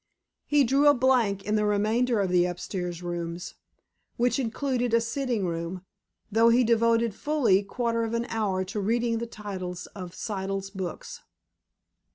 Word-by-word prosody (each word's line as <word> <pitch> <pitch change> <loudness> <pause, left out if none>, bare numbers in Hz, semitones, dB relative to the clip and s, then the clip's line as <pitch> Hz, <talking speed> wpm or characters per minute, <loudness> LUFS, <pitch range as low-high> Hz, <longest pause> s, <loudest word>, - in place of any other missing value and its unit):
He 290 -1 +4
drew 275 +4 +3
a 290 - +7
blank 240 -6 +2
in 210 - -1
the 210 0 +2
remainder 215 +3 +1
of 190 -2 -1
the 180 -1 +4
upstairs 180 0 -4
rooms, 175 0 -4 0.6
which 245 +3 +2
included 245 -1 0
a - - +5
sitting 235 -2 -1
room, 170 +2 -4 0.5
though 225 +2 +5
he 240 +2 +5
devoted 230 -1 +3
fully 240 -8 +2
quarter 230 +3 -1
of 225 +1 -2
an 235 0 -1
hour 195 -4 -1
to 195 +3 -4
reading 230 +3 0
the 235 - -4
titles 185 -5 -6
of 180 -3 -8
Siddle's 195 -1 -4
books. 190 -4 -6
215 Hz, 155 wpm, -27 LUFS, 190-235 Hz, 0.6 s, a